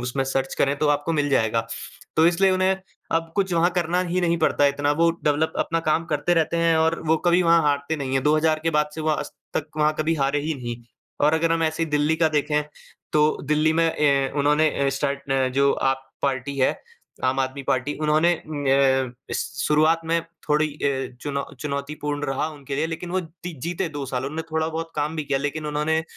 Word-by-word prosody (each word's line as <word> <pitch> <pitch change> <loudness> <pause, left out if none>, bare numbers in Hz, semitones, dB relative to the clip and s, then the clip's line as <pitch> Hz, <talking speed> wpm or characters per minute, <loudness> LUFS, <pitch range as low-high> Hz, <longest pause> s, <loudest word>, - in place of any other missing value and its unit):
उसमें 130 +2 -1
सर्च 135 0 -1
करें, 140 +1 +1
तो 150 - +1
आपको 145 +3 +1
मिल 145 -2 +1
जाएगा। 115 -3 +1 0.5
तो 160 - +6
इसलिए 185 +3 +4
उन्हें 185 +1 +2 0.4
अब 165 0 -1
कुछ 195 -2 +1
वहाँ 170 +1 +3
करना 175 0 0
ही 185 +1 +1
नहीं 170 -1 +2
पड़ता 145 - +2
है, 140 - +5
इतना 145 +1 0
वो 165 +3 +3
डेवलप, 150 +2 +1
अपना 165 0 0
काम 160 +1 +1
करते 160 +4 +1
रहते 165 +1 +1
हैं 165 -1 +3
और 160 +1 +2
वो 160 - +4
कभी 175 +1 +4
वहाँ 170 -1 +5
हारते 145 +2 0
नहीं 135 -2 -4
हैं। 135 - +1
2000 155 +1 +3
के 165 - +1
बाद 150 -1 +1
से 160 - -5
वो 155 - -1
आज 150 - -2 0.2
तक 155 - -1
वहाँ 150 0 +3
कभी 155 +1 +1
हारे 140 -1 0
ही 155 +2 -2
नहीं 120 -3 -5 0.5
और 155 +2 +4
अगर 165 +1 +2
हम 165 0 +1
ऐसे 160 +1 0
ही 160 - -1
दिल्ली 150 +2 +2
का 160 -1 +3
देखें, 150 0 +1 0.5
तो 150 0 +3
दिल्ली 155 +2 +2
में 165 +1 +2
ए 140 -2 +2
उन्होंने 150 +2 +3 0.2
अ, - - +3
स्टार्ट 140 +1 -1
न 135 -1 +2
जो 140 0 +4
आप 135 0 0 0.2
पार्टी 140 0 -1
है, 130 - +3 0.5
आम 130 +1 +1
आदमी 135 +1 -2
पार्टी, 130 +2 -1
उन्होंने 155 +3 +2
न 135 -3 +2 0.2
श - - +1 0.2
शुरुआत 155 +2 +3
में 165 +1 +1 0.3
थोड़ी 150 +1 +3
अ, 135 -3 -2
चुनौ 140 -1 -3 0.2
चुनौतीपूर्ण 145 0 -3
रहा 135 +3 -1
उनके 140 -2 -6
लिए, 155 +3 +1
लेकिन 165 +2 -6
वो 185 +1 0
दि 170 +1 -9
जीते 175 +1 -2
2 145 -3 -5
साल। 130 0 -3
उन्होंने 155 +4 -3
थोड़ा 160 0 0
बहुत 165 0 -5
काम 150 +2 -1
भी 155 - -2
किया, 135 -1 0
लेकिन 145 +2 -3
उन्होंने 150 +2 0
150 Hz, 215 wpm, -23 LUFS, 140-165 Hz, 0.5 s, तो